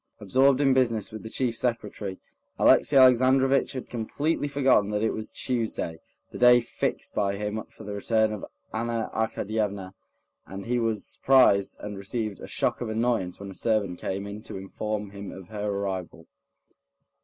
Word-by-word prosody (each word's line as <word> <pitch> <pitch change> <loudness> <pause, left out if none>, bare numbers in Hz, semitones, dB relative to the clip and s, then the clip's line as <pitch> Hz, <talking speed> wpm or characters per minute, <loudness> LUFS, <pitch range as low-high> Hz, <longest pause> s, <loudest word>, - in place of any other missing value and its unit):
Absorbed 130 +6 +3
in 135 -2 +4
business 115 -5 +1
with 110 - -7
the 110 - -8
chief 120 0 -1
secretary, 115 -5 -3 0.4
Alexey 150 - +4
Alexandrovitch 130 +1 +5
had 130 - -6
completely 145 +7 -1
forgotten 135 -7 +3
that 105 0 -1
it 110 - +2
was 110 - -5
Tuesday, 115 -9 -2 0.3
the - - -8
day 125 0 +7
fixed 120 - -3
by 100 -1 0
him 105 +2 -3
for - - -13
the 105 - -6
return 110 +1 +1
of 105 - -6 0.3
Anna 115 0 -2
Arkadyevna, 105 -3 -2 0.5
and 95 +1 -7
he 120 +1 0
was 110 -3 -1
surprised 125 -7 +3
and 105 -1 -6
received 105 +1 -3
a - - -8
shock - - -1
of 120 - -3
annoyance 110 -5 -1
when 100 -1 -7
a - - -9
servant 100 -4 0
came 95 +1 -3
in 100 +1 -7
to 100 - -7
inform 105 +1 -4
him 100 0 -8
of 95 -1 -11
her 105 -1 -3
arrival. 95 -4 -4
110 Hz, 165 wpm, -26 LUFS, 100-120 Hz, 0.5 s, day